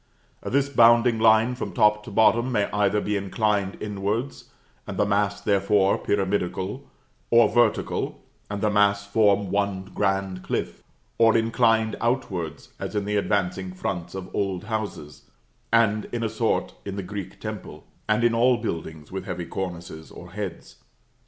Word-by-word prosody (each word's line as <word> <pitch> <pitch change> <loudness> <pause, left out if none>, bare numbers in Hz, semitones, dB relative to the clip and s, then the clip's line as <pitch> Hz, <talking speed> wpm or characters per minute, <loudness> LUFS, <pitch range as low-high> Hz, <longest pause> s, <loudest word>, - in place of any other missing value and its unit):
This 140 +1 +1
bounding 120 -3 +5
line 110 +2 +5
from 125 - -5
top 105 0 +3
to - - -8
bottom 115 +4 +3
may 105 -4 +2
either 105 0 +2
be 105 0 -1
inclined 100 0 0
inwards, 105 +5 -3 0.4
and - - -5
the 105 - +3
mass, 100 0 +1
therefore, 100 -1 +2
pyramidical; 100 +5 -2 0.4
or 120 0 +6
vertical, 120 -3 +1 0.3
and 100 0 -4
the 105 - +2
mass 100 -1 +3
form 100 -2 +2
one 100 -2 -1
grand 95 -2 -1
cliff; - - -3 0.4
or 115 0 +5
inclined 115 -1 +2
outwards, 95 - -2
as - - -5
in 105 -1 0
the 105 0 -1
advancing 95 -2 -1
fronts 90 -3 -4
of 95 -1 -7
old 95 -3 -1
houses, 105 -9 -5 0.4
and, 110 -2 +3
in 120 -1 -4
a 110 - 0
sort, - - -1
in 100 - -5
the 100 - -4
Greek 100 0 -7
temple, - - -7 0.2
and 110 +2 +2
in 120 -1 +4
all 120 +2 +4
buildings 80 -8 -5
with 95 0 -5
heavy 90 - -4
cornices 85 -4 -6
or 85 0 -12
heads. 100 -3 -7
105 Hz, 150 wpm, -25 LUFS, 95-115 Hz, 0.4 s, or